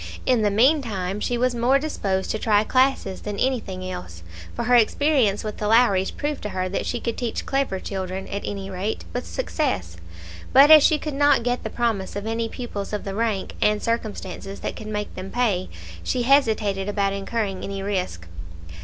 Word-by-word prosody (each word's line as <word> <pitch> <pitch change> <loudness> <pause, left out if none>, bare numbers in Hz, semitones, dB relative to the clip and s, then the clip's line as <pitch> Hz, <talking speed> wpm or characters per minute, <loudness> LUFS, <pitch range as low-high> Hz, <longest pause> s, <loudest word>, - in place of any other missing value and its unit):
In 250 -3 +3
the 210 - +3
meantime, 210 -5 +1
she 240 +3 -1
was 250 +1 +1
more 240 +3 +3
disposed 200 -10 -2
to 215 - -2
try 210 -2 +3
classes 255 -6 +1
than 205 -1 -5
anything 200 -8 -2
else, 90 - -7 0.3
for - - -2
her 245 +2 +1
experience 240 -2 +3
with 215 -1 -5
the 210 - -2
Lowries 210 -4 +4
proved 295 0 -4
to 210 - -4
her 185 -1 -2
that 195 - -2
she 240 - -2
could 230 -1 -3
teach 240 -2 -3
clever 270 -8 0
children, 190 -1 -4
at 200 - -3
any 195 -1 -4
rate, 190 +4 -3
with 245 - -4
success; 180 - -2 0.6
but 280 +3 +8
as 310 -1 +11
she 305 +2 +4
could 300 0 -5
not 285 -3 +4
get 245 +1 -1
the - - -3
promise 225 -6 -1
of 205 +1 -4
any 225 0 -2
pupils 215 -5 -6
of 210 - -2
the 195 - -4
rank 215 -2 -1
and 210 0 +2
circumstances 205 -4 -4
that - - -4
could 215 - -8
make 210 -1 -4
them 185 +1 -7
pay, 205 -6 0 0.3
she 250 - 0
hesitated 220 -7 +2
about 200 -1 0
incurring 200 -1 -3
any 195 -1 -4
risk. 185 - -3
215 Hz, 190 wpm, -23 LUFS, 195-245 Hz, 0.6 s, as